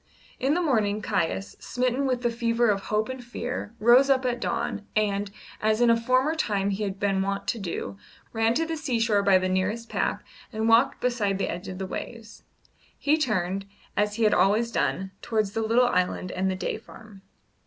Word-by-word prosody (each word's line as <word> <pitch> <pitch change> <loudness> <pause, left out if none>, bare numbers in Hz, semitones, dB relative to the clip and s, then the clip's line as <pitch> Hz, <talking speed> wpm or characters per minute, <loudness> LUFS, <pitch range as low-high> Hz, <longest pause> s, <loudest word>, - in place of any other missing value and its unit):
In 275 +4 +2
the 355 - +1
morning 215 -8 +1
Caius, 195 -2 -2
smitten 255 +2 -1
with 250 -1 -1
the 240 - +2
fever 230 -1 +2
of 195 -1 -2
hope 215 0 0
and 260 -1 -6
fear, 240 -2 -5
rose 245 +5 +6
up 265 -1 +3
at 245 -1 0
dawn, 205 -3 -3
and, 205 -1 0 0.3
as 215 +1 +2
in 240 -1 +5
a - - +5
former 255 +6 +2
time 200 -10 0
he 200 +2 -3
had 195 -2 -3
been 195 -1 +1
wont 200 +1 -2
to 235 - -1
do, 135 - -5 0.3
ran 225 +1 +2
to 325 - +1
the 325 0 -3
seashore 230 -8 +1
by 195 -1 +5
the 185 0 0
nearest 205 +5 -1
path - - -1 0.3
and 220 -1 -1
walked 230 +4 +4
beside 220 -6 0
the 195 - -1
edge 175 +3 -5
of 185 - -6
the 190 - -3
waves. 225 +3 -7 0.6
He 295 +2 +2
turned, 195 - -1 0.3
as 210 0 +1
he 230 - 0
had 215 - +4
always 210 +6 +3
done, 190 -4 -1
towards 215 -3 0
the 225 - -2
little 230 +3 +3
island 180 -1 0
and 190 +1 -1
the 190 - -1
Day 185 - -3
Farm. 215 -3 -14
220 Hz, 200 wpm, -26 LUFS, 195-240 Hz, 0.6 s, rose